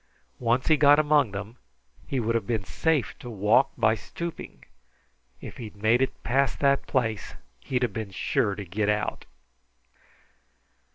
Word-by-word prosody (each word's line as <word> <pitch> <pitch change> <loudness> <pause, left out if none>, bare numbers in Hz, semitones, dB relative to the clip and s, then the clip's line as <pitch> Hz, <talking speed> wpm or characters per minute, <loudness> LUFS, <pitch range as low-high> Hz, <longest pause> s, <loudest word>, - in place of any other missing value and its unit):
Once 120 +1 +1
he 155 - +4
got 145 0 +6
among 150 -4 +3
them, 105 +4 -7 0.5
he 135 - -1
would 115 0 0
have 115 -4 -1
been 110 -4 -1
safe 155 - 0
to 120 - -8
walk 110 +4 +3
by 110 - +3
stooping. 170 - -7 0.8
If - - -9
he'd 110 -4 -8
made 110 +4 +3
it 130 - -2
past 135 +2 +1
that 140 -1 +2
place, 110 -5 -1 0.2
he'd 125 - -1
been 110 -3 -4
sure 100 +2 0
to 100 0 -7
get 100 +4 -1
out." 105 0 -1
115 Hz, 150 wpm, -26 LUFS, 105-135 Hz, 0.8 s, got